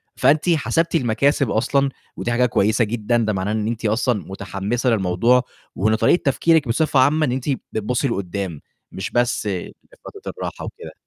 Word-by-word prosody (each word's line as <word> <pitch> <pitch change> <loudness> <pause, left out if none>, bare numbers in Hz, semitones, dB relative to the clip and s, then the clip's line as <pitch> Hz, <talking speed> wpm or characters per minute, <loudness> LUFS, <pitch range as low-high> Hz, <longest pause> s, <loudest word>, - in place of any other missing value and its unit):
فأنتِ 155 +4 +3
حسبتِ 165 +1 +1
المكاسب 140 +1 +2
أصلًا 140 +4 +1 0.3
ودي 120 - -2
حاجة 125 +1 +3
كويسة 110 0 +2
جدًا، 120 +2 0
ده 110 -2 0
معناه 95 +1 -2
إن 110 0 -1
أنتِ 115 -1 -3
أصلًا 110 0 +1
مُتحمِّسة 100 +6 -2
للموضوع، 115 +5 +2 0.3
وإن 110 +4 +2
طريقة 140 +10 +3
تفكيرِك 155 +1 +3
بصفة 140 +4 +2
عامة 150 +4 +4
إن 130 - -1
أنتِ 130 +3 -3 0.2
بتبُصّي 120 +5 -1
لقُدّام، 95 - -4 0.3
مش 95 - -5
بس 120 -2 +1
لفترة 95 -3 -7
الراحة - - -5
وكده. - - -9
120 Hz, 155 wpm, -21 LUFS, 105-135 Hz, 0.3 s, عامة